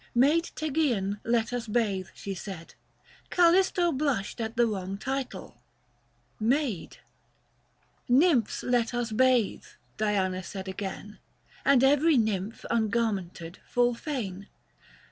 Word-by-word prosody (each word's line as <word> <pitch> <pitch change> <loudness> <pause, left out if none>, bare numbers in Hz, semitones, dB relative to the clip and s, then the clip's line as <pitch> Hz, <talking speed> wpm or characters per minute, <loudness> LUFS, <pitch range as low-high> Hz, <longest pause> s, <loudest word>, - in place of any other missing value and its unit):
" - - -39
Maid 295 +7 +4
Tegesean 260 -11 0
let 230 0 0
us 245 -1 -3
bathe," 210 -4 0
she 200 - -5
said: 180 -2 -8 0.6
Callisto 350 0 +4
blushed 260 -7 -1
at 225 +1 -4
the 240 - +5
wrong 195 -3 -3
title, 245 - -5 0.4
" 120 +1 -40 0.2
Maid." 255 - -4 0.6
" - - -40
Nymphs 260 - +3
let 245 -1 +1
us 240 -1 -2
bathe," 250 -1 +2 0.3
Diana 195 -3 0
said 190 +1 -7
again; 200 +2 -6 0.4
And 270 -2 +4
every 290 +3 +4
nymph 215 -2 -1
ungarmented 205 -6 -1
full 245 0 +1
fain. 210 -8 -5
225 Hz, 120 wpm, -28 LUFS, 195-260 Hz, 0.6 s, the